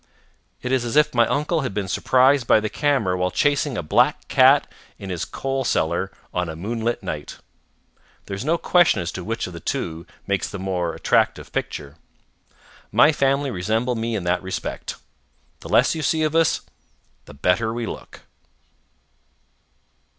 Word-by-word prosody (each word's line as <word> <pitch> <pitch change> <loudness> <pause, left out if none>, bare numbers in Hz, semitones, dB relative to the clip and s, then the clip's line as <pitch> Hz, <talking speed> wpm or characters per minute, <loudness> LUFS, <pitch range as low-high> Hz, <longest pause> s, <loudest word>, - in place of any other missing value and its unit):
It 125 - -2
is 130 -2 +2
as 120 +2 -3
if 150 0 +4
my 120 -2 +4
uncle 155 +3 0
had 130 -7 -4
been 100 -2 -2
surprised 130 +5 +3
by - - +6
the 110 0 -3
camera 135 -11 +1
while 90 0 0
chasing 145 +1 +1
a - - -3
black 75 - +2
cat - - +5 0.3
in 95 -1 -7
his 90 - -3
coal 135 0 -3
cellar - - 0 0.2
on 90 -2 -1
a 80 - -6
moonlight 115 +6 -3
night. 75 -5 -5 0.9
There - - -7
is 100 - -4
no 165 +4 +1
question 175 - +3
as 85 0 -3
to 90 - -6
which 115 +4 -3
of 90 - -8
the 85 - -7
two 80 +1 -4 0.2
makes 100 -1 -1
the 100 - -6
more 90 -3 -2
attractive - - +1
picture. 75 +1 -4 0.9
My 150 - +6
family 140 -1 +1
resemble 110 +6 -1
me 115 0 -2
in 100 - -3
that 90 0 0
respect. 95 0 -5 0.6
The - - -10
less - - +4
you 160 - -4
see 155 +2 +1
of 155 0 0
us, 165 -1 +3 0.6
the - - -13
better 90 +9 +1
we 120 0 -3
look. - - -8
115 Hz, 170 wpm, -22 LUFS, 90-135 Hz, 0.9 s, by